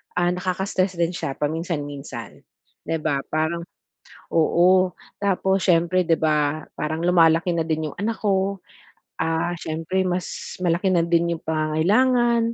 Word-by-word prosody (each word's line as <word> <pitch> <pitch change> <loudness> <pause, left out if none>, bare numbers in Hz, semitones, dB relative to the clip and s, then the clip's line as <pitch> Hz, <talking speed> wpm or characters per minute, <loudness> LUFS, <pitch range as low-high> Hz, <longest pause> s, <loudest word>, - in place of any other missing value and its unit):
ah, 175 0 +2
nakaka-stress 185 +1 -1
din 170 0 0
siya 140 -6 -4
paminsan-minsan, 145 - -4 0.5
di 165 - 0
ba? 145 -3 0
Parang 160 +2 -1 0.7
oo, 180 +3 +4 0.2
tapos 195 -1 +1
siyempre 175 0 +3
'di 165 -1 +2
ba, 150 -1 +1
parang 155 +1 -2
lumalaki 170 0 +4
na 165 - +1
din 160 -1 -1
yung - - -14
anak 220 +4 -2
ko, 195 -1 0 0.6
ah, 165 +2 0
siyempre 165 +3 -2
mas 180 -1 -4
malaki 180 +2 +1
na 170 -2 +3
din 170 0 +2
yung - - -23
pangangailangan. 230 +10 +2
170 Hz, 135 wpm, -23 LUFS, 160-185 Hz, 0.7 s, oo